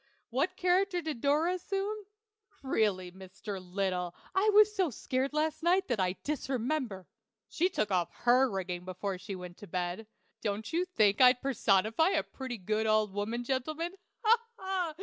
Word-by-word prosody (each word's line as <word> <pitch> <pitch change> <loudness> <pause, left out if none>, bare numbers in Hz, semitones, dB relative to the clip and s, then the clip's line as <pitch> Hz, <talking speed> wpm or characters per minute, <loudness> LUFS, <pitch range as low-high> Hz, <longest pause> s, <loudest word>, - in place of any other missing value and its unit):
What 315 +10 0
character 365 +1 +2
did 310 -8 -4
Dora 305 +5 +2
assume? 395 +3 -3 0.6
Really, 205 -8 0
Mr. 190 +1 -8
Little, 180 -1 -2 0.2
I 400 +3 +3
was 420 0 +6
so 375 -5 +2
scared 260 +2 -2
last 310 +1 -1
night 360 +3 +3
that 240 -4 0
I 185 0 +1
disremember. 260 -7 -2 0.4
She 360 +3 +1
took 215 - -1
off 175 -2 +1
her 250 +2 +5
rigging 180 -3 -3
before 185 +1 -4
she 200 0 -6
went 180 -1 -9
to 205 - -11
bed. 180 +4 -3 0.3
Don't 215 +3 -3
you 350 +2 +2
think 215 - +2
I'd 250 -1 +7
personify 225 - +3
a - - +1
pretty 260 -3 -6
good 215 +3 -1
old 215 -2 +2
woman, 220 +4 -2
gentlemen 305 +7 -2 0.3
ha! 450 +1 +6 0.2
ha! 375 -4 -2
245 Hz, 160 wpm, -31 LUFS, -, 0.6 s, I'd